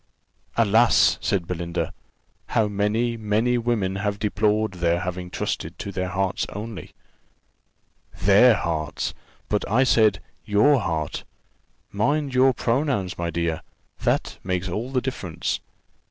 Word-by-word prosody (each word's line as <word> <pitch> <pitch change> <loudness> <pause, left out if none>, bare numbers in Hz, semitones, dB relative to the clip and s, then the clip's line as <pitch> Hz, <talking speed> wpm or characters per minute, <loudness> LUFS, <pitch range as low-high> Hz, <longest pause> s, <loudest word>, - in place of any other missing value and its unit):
"Alas!" 115 +1 +4
said 95 -4 0
Belinda, 85 -1 -3 0.5
"how 110 - +2
many, 105 +4 0
many 110 +3 +1
women 110 -5 0
have 100 0 -1
deplored 105 +1 +1
their 85 -1 +1
having 90 0 -4
trusted - - -3
to 100 - -5
their 90 -1 -2
hearts 95 +1 -1
only." 105 -1 -7 1.3
"Their 105 +6 +6
hearts! 80 -5 -2 0.3
but 105 - 0
I 120 +6 +4
said 110 -7 +4 0.2
your 110 +8 +4
heart: 80 -6 -2 0.7
mind 140 +7 0
your 130 +1 +5
pronouns, 120 - -1
my 85 0 -1
dear; 85 -2 -1 0.4
that - - 0
makes 90 0 -1
all 110 +8 -3
the 130 -2 +1
difference. 95 -11 -3
105 Hz, 125 wpm, -24 LUFS, 90-115 Hz, 1.3 s, Their